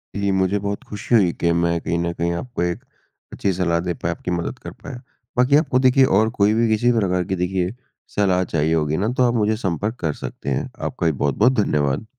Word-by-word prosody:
जी, 100 0 0
मुझे 95 +1 +1
बहुत 100 0 -4
खुशी 105 +3 -1
हुई 95 -6 +4
कि 85 - +3
मैं 85 0 +1
कहीं 85 - -1
ना 85 0 -1
कहीं 85 0 -1
आपको 120 +7 -5
1 90 -1 -2 0.5
अच्छी 100 - 0
सलाह 85 -2 0
दे 90 +1 -2
पाया, 85 0 -3
आपकी 90 - -6
मदद 85 +8 -3
कर - - -8
पाया। 130 -4 -10 0.4
बाकी 125 +3 +4
आपको 145 -4 +3
देखिए, 130 +1 +5
और 110 -1 +3
कोई 100 +2 +4
भी 115 +1 +2
किसी 110 +3 +3
प्रकार 90 -3 0
की 95 - -2
देखिए 90 +1 -1 0.4
सलाह 95 -3 +2
चाहिए 80 -2 0
होगी 75 -1 0
ना, 100 - 0
तो 130 - +2
आप 120 - +1
मुझे 110 -2 +1
संपर्क 100 +2 -2
कर 80 -3 -1
सकते 70 - -7
हैं। 65 - -1
आपका - - -3
भी - - +3
बहुत-बहुत 75 - +2
धन्यवाद। 75 +5 0
95 Hz, 220 wpm, -21 LUFS, 85-110 Hz, 0.5 s, देखिए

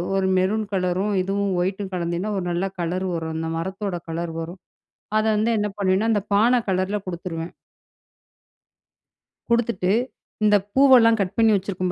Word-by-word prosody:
ஒரு 190 -1 +1
மெரூன் 210 +4 +1
கலரும், 185 +2 0
இதுவும் 195 +1 -1
ஒயிட்டும் 190 +2 -3
கலந்தின்னா, 175 +3 -2
ஒரு 190 - -2
நல்ல 175 +3 -1
கலர் 180 +2 -2
வரும். 160 -1 -3
அந்த 160 0 -3
மரத்தோட 190 +3 -3
கலர் 165 0 -3
வரும், 170 +3 -7 0.6
அத 215 - +1
வந்து 220 +2 +1
என்ன 210 0 0
பண்ணுவேன்னா, 195 +3 +2
அந்த 205 - +1
பான 240 +4 +4
கலர்ல 190 +2 0
குடுத்துருவேன். 170 -1 -5 2.0
குடுத்துட்டு, 235 -6 +1 0.5
இந்த 210 -1 +5 0.2
பூவெல்லாம் 255 -4 +6
கட் 185 -2 -1
பண்ணி 225 -1 +5
வச்சுருக்கோம் 185 -2 -2
190 Hz, 140 wpm, -23 LUFS, 180-210 Hz, 2.0 s, பூவெல்லாம்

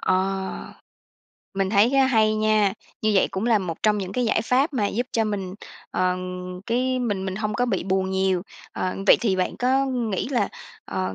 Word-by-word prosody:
Ờ, 190 +1 -1 0.8
mình 195 0 0
thấy 215 +5 +4
á 270 -1 +5
hay 220 -4 +3
nha, 215 -2 +2 0.3
như 215 -1 +2
vậy 195 - +4
cũng 195 +4 -2
là 230 -3 +4
một 175 -4 -5
trong 210 -1 +3
những 190 -1 -4
cái 250 - 0
giải 220 -1 +1
pháp 265 +6 +2
mà 220 -7 +1
giúp 240 +4 -2
cho 225 - +2
mình, 195 -3 -3 0.4
ờ, 180 0 +1 0.5
cái 255 +2 0
mình 205 -6 -1
mình 190 0 -3
hông 215 0 -2
có 245 +3 +1
bị 235 - -1
buồn 190 0 0
nhiều. 190 -1 +1 0.3
Ờ, 185 0 -2
vậy - - +8
thì 200 -5 +1
bạn 185 - -1
có 265 +2 +2
nghĩ 240 -5 -2
là, 255 -4 +1 0.4
ờ, 95 0 -3
210 Hz, 200 wpm, -24 LUFS, 190-240 Hz, 0.8 s, vậy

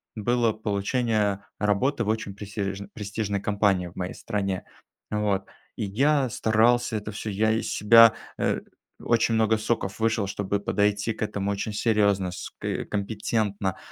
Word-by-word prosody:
было 120 +1 +1
получение 105 -1 0 0.2
работы 105 +5 +1
в - - -6
очень 110 -2 -1
престиэж 100 -1 -4
престижной 105 -1 -3
компании 100 -3 +1
в 85 - -13
моей 90 0 -3
стране. 100 -4 -3 0.5
Вот, 105 -2 0 0.3
и - - -3
я 135 +6 +2
старался 115 +2 +2
это 105 0 -4
всё 105 +1 -5
сделать. 110 +2 +2
Я - - +1
из - - -4
себя, 115 +2 +7 0.2
э, - - 0 0.4
очень 115 -1 +2
много 110 0 +3
соков 110 -2 -2
вышел, 110 -2 +1
чтобы 100 0 -2
подойти 105 +2 +1
к - - -13
этому 100 -2 -1
очень 100 +2 -3
серьезно, 100 -4 +2
ск - - -8 0.3
компетентно, 105 -1 -1
105 Hz, 145 wpm, -26 LUFS, 100-110 Hz, 0.5 s, себя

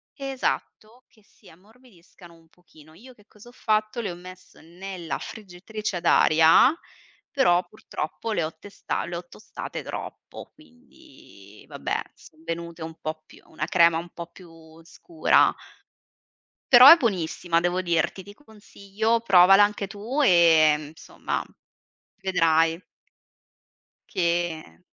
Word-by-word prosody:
esatto, 255 -4 -5
"che 215 - -27
si 200 -1 -23
ammorbidiscano 190 -3 -20
un 165 0 -24
pochino." 155 -2 -21
Io 245 +10 -16
che 210 -4 -25
cosa 215 +3 -17
ho - - -16
fatto? 215 -1 -2
Le 205 -5 -4
ho 175 - -8
messe 185 +1 -15
nella 175 +1 -7
friggitrice 210 0 -7
ad 170 - -9
aria, 160 - +5 0.6
però, 215 -11 +2
purtroppo, 215 +1 -7
le 170 - -1
ho 155 +1 -6
testa 200 +4 -6
le - - -7
ho - - -10
tostate - - -9
troppo, - - -9
quindi 255 - -19
vabbè, - - -4
son 155 - -20
venute 170 0 -7
un 160 0 -7
po' 155 0 -6
più - - -19
una 155 -1 -6
crema 170 -4 +3
un 175 - -10
po' 170 0 -9
più 165 -2 -17
scura. 335 - +1 1.2
Però 250 +2 +10
è 330 - +11
buonissima, 180 - -1
devo 175 +2 -1
dirti. 170 +2 -1
Ti 205 - -14
consiglio, 220 -1 -4
provala 195 -1 +6
anche 205 -1 -3
tu, 220 +8 -5
ehm, 160 - +4
insomma, 160 - -6 0.8
vedrai 165 -3 +1 1.3
che 170 - -3
180 Hz, 130 wpm, -24 LUFS, 165-220 Hz, 1.3 s, è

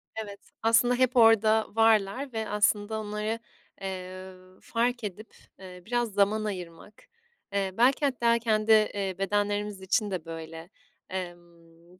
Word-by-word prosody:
Evet, 205 -2 -6 0.2
aslında, 230 +2 +4
hep 255 +1 +1
orada 220 -1 +5
varlar 225 +4 +2
ve 220 -1 -3
aslında 210 +1 +1
onları, 210 +1 -3 0.4
eee, 185 0 -6 0.3
fark 240 +1 -1
edip, 210 +2 -7 0.2
eee, 180 -1 -11
biraz 240 -1 -1
zaman 205 +2 +2
ayırmak. 185 - -8 0.5
Eee, 195 -1 0
belki 260 +5 +3
hatta 235 -3 +2
kendi, 220 -1 +1
eee, 205 -3 +2
bedenlerimiz 205 0 -1
için 205 +2 0
de 175 -3 -4
böyle. 165 0 -8 0.4
Emm, 175 -1 -9
210 Hz, 125 wpm, -27 LUFS, 190-225 Hz, 0.5 s, orada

